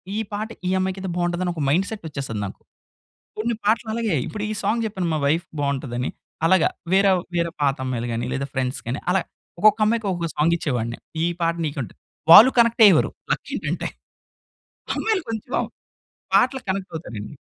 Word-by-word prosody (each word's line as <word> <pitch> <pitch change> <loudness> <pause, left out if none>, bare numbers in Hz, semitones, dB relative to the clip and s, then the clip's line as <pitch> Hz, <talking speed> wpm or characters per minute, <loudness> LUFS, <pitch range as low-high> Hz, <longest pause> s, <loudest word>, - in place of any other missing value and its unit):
ఈ - - -1 0.2
పాట 210 +2 -2 0.2
ఈ - - +1
అమ్మాయికయితే 190 0 -2
బావుంటదని 175 0 0
ఒక 160 - -4
మైండ్ 180 +7 +2
సెట్టొచ్చేస్తది 140 - -5
నాకు. 95 - -9 0.8
కొన్ని 230 +2 0
పాటలలాగే. 220 -1 +1
ఇప్పుడు 210 -1 -4
ఈ - - -1
సాంగ్ 225 +3 +1
చెప్పాను 190 -5 -2
మా - - 0
వైఫ్‌కి 160 +3 0
బావుంటదని, 135 -3 -2 0.4
అలాగా 185 -1 +4 0.3
వేరవ్ 190 -2 +4
వేరే 170 -1 0
పాతమ్మాయిలు‌ 130 -4 -1
గానీ, 115 +1 -2
లేదా 140 +1 -3
ఫ్రెండ్స్‌ 130 0 -2
గానీ, 130 +4 -2
అలా 190 - +2 0.4
ఒక్కొక్కమ్మాయికి, 215 +1 +3
ఒకొక్క 170 -2 -3
సాంగిచ్చేవాడిని, 145 -8 0 0.3
ఈ - - +3 0.2
పాట 165 0 +2
నీకంటూ. 140 -5 -4 0.4
వాళ్ళు 240 +9 +10
కనెక్టయ్యేవారు, 230 -3 +5 0.2
లక్కేంటంటే. - - -3 1.1
అమ్మాయిలు 435 -4 0
కొంచం 225 +3 -2 0.7
పాటలకి 255 0 +3
కనెక్టవుతారండి. 160 - -5
175 Hz, 135 wpm, -23 LUFS, 140-215 Hz, 1.1 s, వాళ్ళు